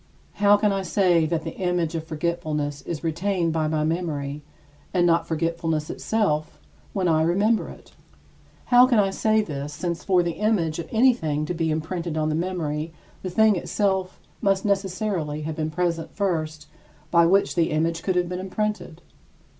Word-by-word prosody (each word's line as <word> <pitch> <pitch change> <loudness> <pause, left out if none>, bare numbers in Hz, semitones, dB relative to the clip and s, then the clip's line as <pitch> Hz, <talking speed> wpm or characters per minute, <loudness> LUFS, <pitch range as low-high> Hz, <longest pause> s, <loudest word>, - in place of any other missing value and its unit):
How 205 0 +6
can 210 0 +2
I 195 0 0
say 180 -4 +2
that 165 0 -1
the 165 - -6
image 180 -3 0
of 165 -1 -3
forgetfulness 155 -3 -2
is 165 -2 -4
retained 170 +1 0
by 160 -1 0
my 155 0 0
memory, 150 -3 -2 0.5
and 175 -1 +4
not 170 -1 +2
forgetfulness 165 -1 -1
itself, 155 -9 -1 0.3
when 190 -2 0
I 160 -2 +3
remember 200 +7 +2
it? - - -14 0.8
How 245 +1 +8
can 245 -3 +3
I 195 -2 +3
say 215 +2 +2
this, 145 -4 -5
since 170 +2 -3
for 185 -2 +3
the 170 0 -3
image 175 -8 +1
of 165 - -6
anything 220 - +2
to 180 - -3
be 165 -1 -1
imprinted 160 +1 -3
on 155 0 +1
the - - 0
memory 160 -2 -2 0.3
the 185 - -4
thing 220 +3 +4
itself 190 0 -1 0.2
must 195 0 +1
necessarily 190 -6 -1
have 155 0 -4
been 155 -1 -1
present 165 0 -2
first 155 -6 -2 0.5
by 170 -1 +5
which 195 +3 +3
the 170 -2 +2
image 165 +2 0
could 185 +1 -1
have 180 -1 +1
been 180 +1 -4
imprinted? 190 -3 -3
170 Hz, 170 wpm, -24 LUFS, 155-195 Hz, 0.8 s, How